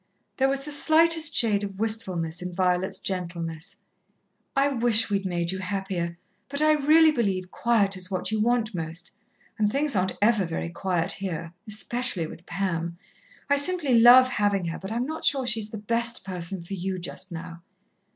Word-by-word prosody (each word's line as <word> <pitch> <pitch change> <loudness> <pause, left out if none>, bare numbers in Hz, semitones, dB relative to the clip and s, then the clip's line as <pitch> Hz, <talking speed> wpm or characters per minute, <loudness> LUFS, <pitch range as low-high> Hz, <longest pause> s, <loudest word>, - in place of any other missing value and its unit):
There 270 0 +3
was 275 0 -2
the 300 - -6
slightest 320 +1 +3
shade 210 -3 +2
of 195 -1 -6
wistfulness 190 -6 -1
in 180 -1 -6
Violet's 180 0 0
gentleness. 170 -2 -4 0.8
"I 275 +1 +3
wish 230 -4 +2
we'd 195 -1 0
made 175 -1 -1
you 190 - -4
happier, 185 -3 -3 0.3
but 280 - -2
I 310 0 +4
really 310 +2 +5
believe 195 -9 -1
quiet 210 -5 +2
is 185 0 0
what 185 +1 -2
you 220 - 0
want 230 -1 +1
most, 165 0 -4 0.5
and 210 -1 +2
things 285 0 0
aren't 185 0 0
ever 210 -1 +3
very 165 -1 -3
quiet 175 -1 -1
here 170 -4 -5
especially 215 -3 -1
with 165 +2 -11
Pam. 170 -2 -2 0.5
I 285 - +3
simply 295 -2 +2
love 245 +2 +8
having 205 -6 0
her, 165 - -5
but 190 +2 -7
I'm 235 +2 -1
not 315 +3 -6
sure 270 -3 +2
she 230 -2 0
is 210 -1 -4
the 220 - -6
best 230 0 -2
person 180 -1 -5
for 195 - -7
you, 190 0 -3
just 185 +1 -6
now." 165 0 -8
200 Hz, 180 wpm, -26 LUFS, 180-245 Hz, 0.8 s, love